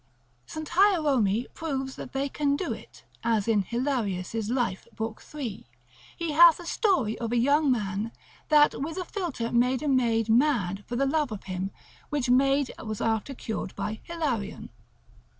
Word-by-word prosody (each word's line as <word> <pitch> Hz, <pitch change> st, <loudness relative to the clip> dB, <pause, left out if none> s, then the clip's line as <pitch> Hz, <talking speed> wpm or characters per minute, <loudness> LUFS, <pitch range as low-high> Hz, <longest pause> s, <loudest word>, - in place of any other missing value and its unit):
St. 315 Hz, -1 st, -6 dB
Hierome 295 Hz, -, +3 dB
proves 270 Hz, -4 st, -3 dB
that -, -, -8 dB
they 275 Hz, +1 st, -1 dB
can 280 Hz, 0 st, 0 dB
do 350 Hz, +4 st, -2 dB
it -, -, -13 dB, 0.2 s
(as 225 Hz, -3 st, +1 dB
in 220 Hz, -3 st, +3 dB
Hilarius' 225 Hz, -4 st, -2 dB
life, 240 Hz, -6 st, -1 dB
epist. -, -, -26 dB, 0.4 s
lib. 245 Hz, -9 st, -4 dB
3); -, -, -21 dB, 0.5 s
he 335 Hz, -2 st, -2 dB
hath 335 Hz, +2 st, +7 dB
a 350 Hz, -, -9 dB
story 330 Hz, -, +1 dB
of 230 Hz, -1 st, -3 dB
a 240 Hz, -, +2 dB
young 285 Hz, +4 st, +3 dB
man, 210 Hz, -1 st, -1 dB, 0.4 s
that 300 Hz, -1 st, +6 dB
with 320 Hz, +5 st, -4 dB
a 370 Hz, -, -1 dB
philter 335 Hz, -, -3 dB
made 250 Hz, +3 st, +2 dB
a -, -, -1 dB
maid 235 Hz, -5 st, +2 dB
mad 220 Hz, -6 st, +2 dB
for 240 Hz, -, -4 dB
the 275 Hz, +3 st, +2 dB
love 290 Hz, -2 st, +1 dB
of 210 Hz, -, -6 dB
him, 185 Hz, 0 st, -3 dB, 0.4 s
which 275 Hz, -5 st, 0 dB
maid 275 Hz, +1 st, +3 dB
was 215 Hz, -2 st, -4 dB
after 225 Hz, +4 st, -1 dB
cured 220 Hz, -5 st, -5 dB
by 215 Hz, +1 st, -3 dB
Hilarion. 270 Hz, -12 st, -3 dB
255 Hz, 170 wpm, -27 LUFS, 220-295 Hz, 0.5 s, hath